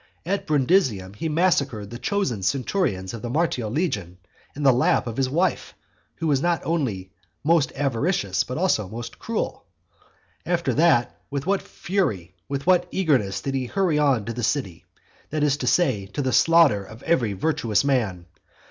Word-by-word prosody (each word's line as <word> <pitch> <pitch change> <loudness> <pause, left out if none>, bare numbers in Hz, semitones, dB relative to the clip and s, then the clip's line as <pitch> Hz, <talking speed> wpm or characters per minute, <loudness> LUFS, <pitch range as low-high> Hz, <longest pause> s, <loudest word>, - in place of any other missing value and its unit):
At 195 +3 -2
Brundusium 130 - +2
he 160 +10 -3
massacred 140 - +1
the 120 - -7
chosen 130 - -1
centurions 115 - -1
of 115 - -6
the 120 - -4
Martial 130 -6 0
legion 105 - -2 0.4
in 145 - -5
the 135 -2 +6
lap 125 +1 +2
of 115 -2 -5
his 130 0 0
wife, 175 +7 -1 0.4
who 165 - -5
was 140 -4 +2
not 170 -1 +1
only 120 - -2 0.3
most 160 -1 +3
avaricious 135 - 0
but 125 - -5
also 155 - +1
most 115 +2 -8
cruel. - - -3 0.8
After 170 -5 0
that 150 -4 +2
with 140 0 -3
what 195 +1 +1
fury, 105 - -2 0.2
with 140 0 -3
what 180 -1 +4
eagerness 130 - +1
did 135 - -3
he 130 -2 -1
hurry 175 -1 +1
on 135 -8 +2
to 115 - -4
the 120 - -5
city, 110 - -2 0.4
that 155 0 -1
is 145 -2 +3
to 130 - -4
say, 125 - +2
to 145 - -2
the 130 -1 0
slaughter 165 -12 +5
of 110 +4 -13
every 120 -11 +1
virtuous 110 -3 0
man! 110 -11 0
135 Hz, 170 wpm, -24 LUFS, 110-165 Hz, 0.8 s, the